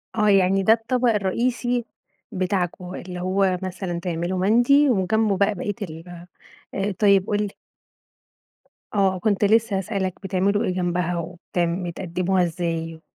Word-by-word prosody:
آه، 210 -1 +3
يعني 195 0 +3
ده 220 +4 +6
الطبق 240 +2 0
الرئيسي 240 +4 0 0.5
بتاعكم، 180 -1 -2
اللي 180 -1 -7
هو 185 0 +1
مثلًا 185 -2 -4
تعملوا 175 +1 -2
مندي 245 +8 +4
وجنبه 215 -1 +1
بقى 200 +1 +2
بقية 205 +3 -3
ال 175 -1 -8 0.5
آآ، 195 +1 -1
طيب 200 -2 +4
قُل 205 - 0
لي. 205 - -4 1.4
آه، 190 -2 +2
كنت 205 +1 +1
لسه 220 -1 +3
هسأل 195 0 -2
لك 185 -1 -1
بتعملوا 195 +2 +1
إيه 185 - -1
جنبها 175 -1 -1
وبت 170 +2 -8
بتقدموها 180 +1 0
إزاي؟ 165 -1 -3
190 Hz, 135 wpm, -23 LUFS, 180-205 Hz, 1.4 s, ده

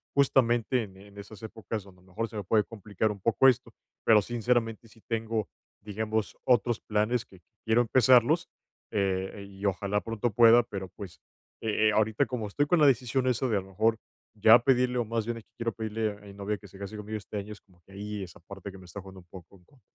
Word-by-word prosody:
justamente 125 -3 +3
en 95 -3 -9
en 100 +1 -16
esas 105 +1 -11
épocas 110 -1 -5
donde 90 -2 -18
a - - -24
lo - - -24
mejor 115 +5 -2
se 110 0 -9
me 100 - -3
puede 105 +3 +3
complicar 105 -1 -3
un 100 - -8
poco 115 +5 +4
esto. 125 -2 +2 0.3
Pero, 110 -2 +6
sinceramente, 120 0 -1
sí 110 +1 -21
tengo, 115 -2 -2 0.3
digamos, 110 +1 -3
otros 120 -2 +2
planes 110 +3 0
que 95 - -18 0.2
quiero 110 +2 +3
empezarlos, 130 +7 +4 0.4
eh, 95 -1 -1
y 95 0 -13
ojalá 100 +1 0
pronto 115 +1 -2
pueda, 120 +1 +7
pero 95 -4 -6
pues, 95 -2 -11 0.4
eh 110 0 +2
eh, - - +2
ahorita 110 0 +2
como 115 -4 -4
estoy 145 +8 0
con 175 +3 +2
la 150 - +6
decisión 130 0 +2
esa 125 +1 +1
de 110 - +1
a 95 - -1
lo 95 - -14
mejor 110 +4 +1 0.4
ya 110 +2 +7
pedirle, 125 0 +2
o 120 - 0
más 115 0 -2
bien 120 0 -3
es 110 - -10
que - - -42
quiero 115 -1 -1
pedirle 110 0 -2
a - - -9
mi 100 - -11
novia 100 +1 -3
que 100 - -14
se 95 - -15
case 100 +1 -7
conmigo 105 +1 -5
este 105 0 -7
año, 100 +1 -5
es 105 - -14
como 90 -3 -27
que 95 - -17
ahí 105 0 -5
esa 85 -3 -11
parte 100 +2 -9
que 95 - -12
me 95 - -14
está 90 +3 -9
jugando 95 0 -12
un - - -24
poco 90 +1 -13
en 90 - -25
contra. 140 - -25
110 Hz, 235 wpm, -28 LUFS, 100-115 Hz, 0.4 s, pueda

